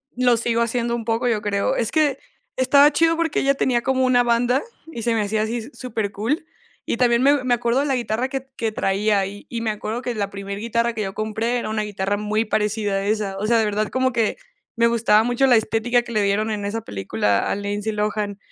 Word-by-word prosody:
Lo 245 -1 +3
sigo 235 0 0
haciendo 235 0 0
un 230 -2 -5
poco, 230 +2 0
yo 225 -3 +1
creo. 200 -1 0
Es 230 - -1
que, 295 -4 +2 0.4
estaba 280 +3 +5
chido, 330 +2 +3
porque 330 -2 0
ella 275 0 +2
tenía 245 -3 +1
como 260 +1 +1
una 250 -1 +4
banda, 245 +2 +2 0.3
y 235 - -6
se 235 +1 +1
me 220 - +1
hacía 215 +1 0
así 220 +2 -1
s 235 +5 -7
supercool, 225 +4 -3 0.4
y - - -2
también 240 0 +3
me 280 -1 +4
me 250 -1 +2
acuerdo 235 +2 0
de 285 - +1
la 270 - +1
guitarra 240 0 -1
que 270 -1 -5
que 225 -3 -2
traía 205 +1 +1
ahí, 195 +1 -5
y 235 - -5
y - - -2
me 225 -1 0
acuerdo 215 +3 -4
que 245 - -2
la 205 -3 -2
primer 200 0 -6
guitarra 230 +1 0
que 220 - -4
yo 195 -2 -3
compré 220 +3 -1
era 235 - -3
una 215 -1 -1
guitarra 205 -1 -2
muy 210 +2 -1
parecida 210 -1 -1
a 195 0 -1
esa. 210 -2 -1
O 210 - -2
sea, 235 +1 +4
de 220 - +2
verdad 210 0 0
como 260 0 +1
que 230 -2 0 0.4
me 230 - +3
gustaba 225 -2 +3
mucho 245 +3 +2
la 250 - +6
estética 225 +2 +1
que 240 - -9
le 215 -2 +1
dieron 205 +2 +1
en 210 -1 -3
esa 220 +3 -3
película 100 - -1
a - - 0
Lindsay 205 +2 -3
Lohan, 210 -1 -2
225 Hz, 240 wpm, -22 LUFS, 210-245 Hz, 0.4 s, la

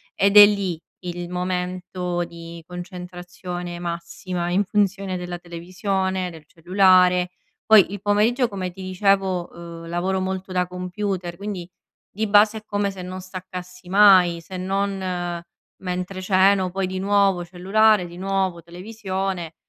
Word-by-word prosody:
Ed 200 +1 +3
è 205 - +13
lì 195 -5 -1 0.2
il 175 0 -5
momento 180 0 -2
di 170 0 -10
concentrazione 180 -1 -7
massima 170 +1 -4
in 195 +3 +3
funzione 195 -2 0
della 175 0 -6
televisione, 185 +2 -2
del 160 -2 -12
cellulare 180 +1 +3 0.3
Poi 210 -4 +6
il 205 - -5
pomeriggio 220 +5 +2
come 190 -2 -4
ti 190 +2 -11
dicevo, 185 -1 +1 0.3
ehm, - - -10
lavoro 185 +3 -1
molto 190 0 -4
da 180 -1 0
computer, 180 -1 -4
quindi 200 -4 -5 0.4
di 220 +2 -2
base 210 +2 +5
è - - -24
come 205 -1 -1
se 190 -1 -9
non 185 +1 -6
staccassi 180 -1 -9
mai 185 -4 +6
se 185 +2 -8
non 185 -2 -2 0.3
mentre 185 +1 -4
ceno. 190 0 +3
Poi 190 +1 -2
di 185 0 -4
nuovo 195 -2 +2
cellulare, 195 +3 +3
di 175 0 -10
nuovo 190 -2 -1
televisione, 185 -1 -5
185 Hz, 135 wpm, -23 LUFS, 175-195 Hz, 0.4 s, è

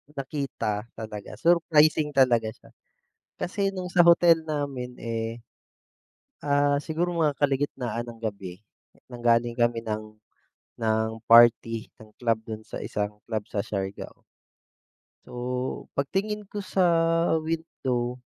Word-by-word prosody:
nakita 130 -6 -3
talaga, 110 -2 -7
surprising 155 -3 +4
talaga 120 -4 +4
siya. - - -19 0.7
Kasi 195 +2 -1
no'ng 185 -2 -5
sa 175 -2 +6
hotel 170 -1 +6
namin, 140 -5 -4
eh, 115 0 -4 1.0
ah, 145 0 +2
siguro 175 +3 -2
mga 155 -4 +1
kalagitnaan 135 -4 -1
ng 115 - -12
gabi 100 -5 -5 0.5
nanggaling 120 -1 +1
kami 120 -1 +2
ng 110 -1 -5 0.6
ng 110 0 +1 0.2
party 115 -1 +6
ng 110 -1 -15
club 115 -2 +2
do'n 110 -1 -6
sa - - -7
isang 105 0 -3
club 110 -2 -2
sa - - -3
Siargao. 95 -2 -5 1.1
So, 125 +1 -4
pagtingin 200 +9 -1
ko 205 +1 -6
sa 185 -1 +1 0.6
window 130 -7 -3
125 Hz, 115 wpm, -26 LUFS, 115-155 Hz, 1.1 s, sa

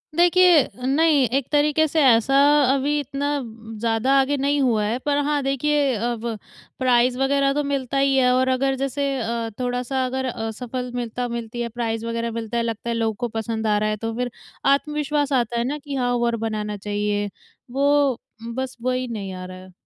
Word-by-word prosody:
देखिए, 350 -3 +5 0.2
नहीं 285 -1 +3
एक 275 - -2
तरीके 300 +1 +3
से 315 +2 +1
ऐसा 245 +2 +4 0.4
अभी 290 +2 +1
इतना 285 +1 -3 0.5
ज़्यादा 230 +3 +1
आगे 275 +2 +2
नहीं 285 +2 +1
हुआ 225 -5 +2
है, 235 +4 -1
पर 285 +1 0
हाँ 290 -1 +1
देखिए 275 -1 +1
अब 235 +1 -3 0.5
प्राइज़ 250 0 +3
वगैरह 275 0 +2
तो 295 - 0
मिलता 275 -1 -2
ही 275 0 +3
है 250 -1 +4
और 260 +1 +2
अगर 270 +1 +1
जैसे 275 +1 -2
अ, 230 0 -2
थोड़ा-सा 250 +1 -1
अगर 260 +1 -2
असफल 250 +1 -4
मिलता 245 0 -3
मिलती 235 0 -5
है 235 - -2
प्राइज़ 225 -1 -3
वगैरह 230 0 -2
मिलता 230 0 -4
है, 235 - +1
लगता 230 0 -4
है 235 - 0
लोगों 225 -1 0
को - - 0
पसंद 225 0 -3
आ 210 - +3
रहा 215 +1 0
है, 215 - -1
तो 225 +1 -4
फिर 250 -1 -2 0.4
आत्मविश्वास 295 -1 -1
आता 240 -2 +1
है 235 - +1
ना 295 - -2
कि 285 -1 -7
हाँ 245 -1 0
और 235 0 +1
बनाना 210 -1 -3
चाहिए, 205 0 -2 0.4
वो 280 -1 +2 0.4
बस 260 -1 -4
वही 255 0 -1
नहीं 200 -5 -5
आ 185 0 -7
रहा 185 0 -9
है। 185 0 -13
250 Hz, 190 wpm, -23 LUFS, 230-275 Hz, 0.5 s, देखिए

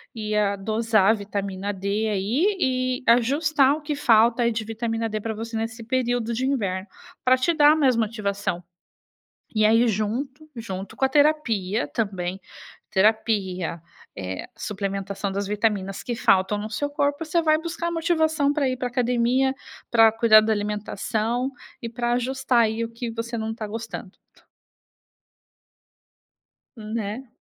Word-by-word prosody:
e 215 -1 -3
a 200 -1 +2
dosar 215 0 +2
a - - +4
vitamina 200 -1 -4
D 200 +3 -1
aí 240 - +1
e 255 -2 0
ajustar 275 +4 +4
o 310 - -8
que 295 0 -3
falta 235 -3 +4
aí 235 - +2
de 225 0 -2
vitamina 225 0 -2
D 215 0 -3
para 225 0 -3
você 225 +1 -5
nesse 225 +1 -4
período 245 -1 -1
de 260 +3 -1
inverno, 200 -8 -1 0.4
pra 255 0 +6
te 255 +7 +2
dar 295 0 +6
mais 270 -6 +3
motivação, 200 -5 -2 0.9
e 215 -1 +3
aí 225 +3 +5
junto 260 +9 -3
junto 195 -4 -6
com - - -4
a - - +1
terapia 255 -9 +2
também 190 -4 -3 0.5
terapia 190 -5 +1 0.4
é 95 -1 -5
suplementação 195 -1 -3
das 200 +1 -2
vitaminas 205 -2 -1
que 240 - -3
faltam 195 -1 +2
no 215 +1 -5
seu 290 +6 -2
corpo. 285 +1 -1
Você 320 +2 +1
vai 310 -1 +4
buscar 340 +1 -4
a - - -1
motivação 315 -3 +1
pra 290 -3 +1
ir 255 - -1
para 250 0 -2
a - - -9
academia, 250 +2 +1 0.4
pra 225 -1 +6
cuidar 225 -1 +6
da 220 - 0
alimentação 220 +4 -2 0.3
e 230 - -4
para 240 +1 -1
ajustar 250 0 +1
aí 225 +1 0
o 230 - -4
que 230 0 -5
você 230 +1 -4
não 220 0 -3
está 220 -1 -5
gostando. 225 -3 -6 2.7
Né, 220 +3 -5
225 Hz, 155 wpm, -24 LUFS, 210-255 Hz, 2.7 s, pra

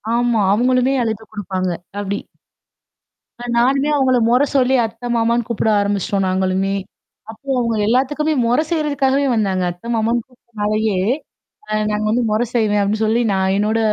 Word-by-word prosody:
ஆமா. 240 -2 +1
அவங்களுமே 255 +4 +2
அழுத்தம் 220 -1 -4
குடுப்பாங்க. 185 -3 -3 0.3
அப்டி. 200 0 -3 1.2
அ - - -6
நானுமே 270 +4 +2
அவங்கள 260 -3 +3
மொற 250 +2 +4
சொல்லி 265 -1 +3
அத்தை, 230 +2 -5
மாமான்னு 235 0 +1
கூப்பிட 230 -1 0
ஆரம்பிச்சுட்டோம் 200 0 0
நாங்களுமே. 190 +1 0 0.6
அப்போ 225 +5 -13
அவங்க 230 -2 0
எல்லாத்துக்குமே 290 +6 +1
மொறை 245 +6 +2
செய்றதுக்காகவே 285 -4 +1
வந்தாங்க. 195 -5 0
அத்தை, 175 +6 -12
மாமன்னு 230 +2 +1
கூப்பி்டனாலயே. 215 -4 -2 0.7
அ - - -10 0.2
நாங்க 210 0 -1
வந்து 245 +2 +1
மொற 215 - +1
செய்வேன் 210 -3 +2
அப்டி 205 +2 0
சொல்லி, 220 +2 +2
நான் 190 0 +1
என்னோட 215 +2 +1
225 Hz, 140 wpm, -19 LUFS, 205-250 Hz, 1.2 s, மொற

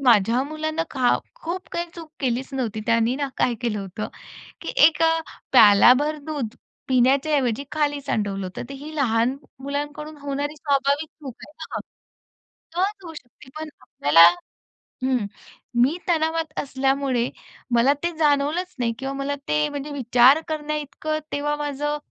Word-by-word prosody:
माझ्या 235 0 +4
मुलांना 310 +2 -2
खा 255 -3 +3 0.2
खूप 370 -6 -6
काही 345 0 -2
चूक 330 -2 -10
केलीच 255 -1 -1
नव्हती. 230 -5 -2
त्यांनी 230 +1 +3
ना 285 -1 -2
काय 245 - +2
केलं 235 -4 -1
होतं? 195 +2 -5 0.5
की - - -5 0.2
एका 325 0 +2 0.4
प्यालाभर 250 +6 +6
दूध 285 -8 -4 0.3
पिण्याच्या 265 +4 +3
ऐवजी 255 -2 0
खाली 290 -2 0
सांडवलं 200 -6 -2
होतं. 185 - -6
तर - - -6
ही 310 +2 -8
लहान 245 -2 +2 0.2
मुलांकडून 290 +2 -5
होणारी 285 +1 -3
स्वाभाविक 285 0 +1
चूक 290 -5 -10
आहे - - -16 0.2
ना? - - -1 1.0
सहज 390 +2 -1
होऊ 330 - -8
शकते. 260 -3 -14
पण 315 0 -5
आपल्याला 155 +3 +5 0.8
हं. 255 -4 +1 0.6
मी 280 +8 +3
तणावात 320 -2 0
असल्यामुळे 270 -2 0 0.5
मला 245 +4 +5
ते 345 - +1
जाणवलंच 305 +4 +1
नाही 235 -2 0
किंवा 270 0 -3
मला 275 +1 -2
ते 150 0 +2
म्हणजे 290 +1 -5
विचार 255 +1 +5
करण्याइतकं 305 0 -3
तेव्हा 295 +1 -1
माझं 295 0 -2
280 Hz, 140 wpm, -23 LUFS, 245-305 Hz, 1.0 s, प्यालाभर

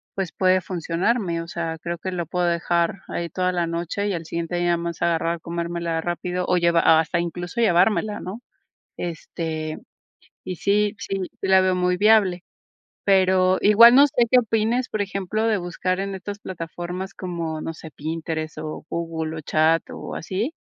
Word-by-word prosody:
pues, 190 -4 -2
puede 185 0 +3
funcionarme, 175 +2 -1
o 165 - -8
sea, 165 -1 -3
creo 170 0 -3
que 185 +3 -5
lo 175 -2 -3
puedo 180 +3 -1
dejar 170 +2 0
ahí 170 0 -3
toda 185 +2 0
la 175 -2 0
noche 170 +4 -2
y 205 - 0
al 170 -2 -3
siguiente 170 +1 -3
día 175 0 0
nada 170 - +3
más 170 0 -5
agarrar, 170 0 0
comérmela 170 0 -3
rápido 180 +1 -2
o 180 - +3
llevar 170 -1 +3
hasta 160 +2 +4
incluso, 175 +5 -4
llevármela, 210 +1 +3
¿no? 190 +5 -6 0.6
Este, 160 -2 -4 0.7
y 185 - -4
sí, 205 +3 +1
sí, 195 - -3 0.2
sí - - -1
la 190 0 +6
veo 185 0 +2
muy 180 0 +1
viable. 200 -3 +4 0.6
Pero 185 -1 +4
igual, 230 +4 +8
no 280 +2 +8
sé 285 - -4 0.2
qué 255 - +6
opines, 225 +2 0
por 215 - -2
ejemplo, 200 +2 -2
de 220 -2 +2
buscar 185 +1 -2
en 195 0 -3
estas 200 +2 -6
plataformas 180 +1 -6
como, 170 -4 -4
no 165 - -4
sé, 160 0 -10
Pinterest 160 0 -4
o 155 0 -6
Google, 165 -1 -3
o - - -5
Chat, 160 +2 +3
o - - -7
así, 205 - -3
175 Hz, 175 wpm, -23 LUFS, 165-195 Hz, 0.7 s, igual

